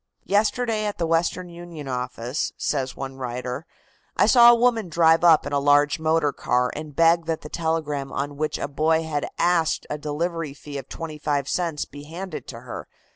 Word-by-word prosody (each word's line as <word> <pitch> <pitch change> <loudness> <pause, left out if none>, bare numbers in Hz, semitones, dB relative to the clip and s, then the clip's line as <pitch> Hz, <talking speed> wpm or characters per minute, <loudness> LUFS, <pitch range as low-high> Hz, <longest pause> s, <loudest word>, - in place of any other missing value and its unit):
"Yesterday, 215 +1 +1
at 205 - -3
the 170 - 0
Western 165 +2 0
Union 170 -4 -9
office," 125 +1 -3
says 135 -3 -2
one 135 0 -6
writer, 125 +3 -5 0.5
"I - - +5
saw 240 -2 +8
a 240 - +8
woman 230 -5 +2
drive 165 0 +4
up 165 -3 +6
in - - -4
a 140 - +3
large 145 +2 +3
motor 160 -2 +2
car 125 0 0
and 150 -1 -7
beg 165 0 +4
that 165 -1 -1
the 150 - -9
telegram 155 -5 -2
on 145 +1 -3
which 155 +1 -2
a - - -3
boy 160 +3 +1
had 150 -3 -2
asked 170 -2 +2
a 150 - -3
delivery 155 0 -3
fee 140 -1 -7
of 135 - -11
twenty 155 -2 -6
five 145 -2 -1
cents 165 -2 -1
be 145 0 -11
handed 170 +2 -7
to 115 -2 -8
her. 125 - -8
155 Hz, 190 wpm, -24 LUFS, 140-170 Hz, 0.5 s, saw